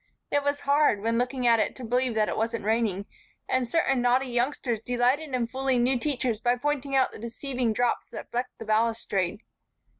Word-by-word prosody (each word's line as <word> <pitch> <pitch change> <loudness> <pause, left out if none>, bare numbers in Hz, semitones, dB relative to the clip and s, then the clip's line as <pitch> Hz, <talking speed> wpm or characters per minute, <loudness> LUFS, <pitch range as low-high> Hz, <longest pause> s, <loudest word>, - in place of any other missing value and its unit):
It 285 - +2
was 285 0 -1
hard 280 -7 +3
when 230 +1 +1
looking 250 0 -1
at 230 -1 +5
it - - 0
to 255 - -9
believe 245 0 0
that 215 -1 +2
it - - -2
wasn't 225 -1 -2
raining, 215 -3 0 0.4
and 255 -2 0
certain 270 -4 +2
naughty 250 +2 +3
youngsters 245 -1 -1
delighted 255 +4 +1
in 245 -2 0
fooling 260 0 0
new 250 0 +2
teachers 250 -5 -1
by 245 +1 +2
pointing 280 +1 -2
out 265 - +3
the - - -11
deceiving 240 +1 -2
drops 240 +2 0
that - - -9
flecked 250 +1 -3
the 225 - -8
balustrade. 215 -3 0
245 Hz, 190 wpm, -27 LUFS, 230-265 Hz, 0.4 s, at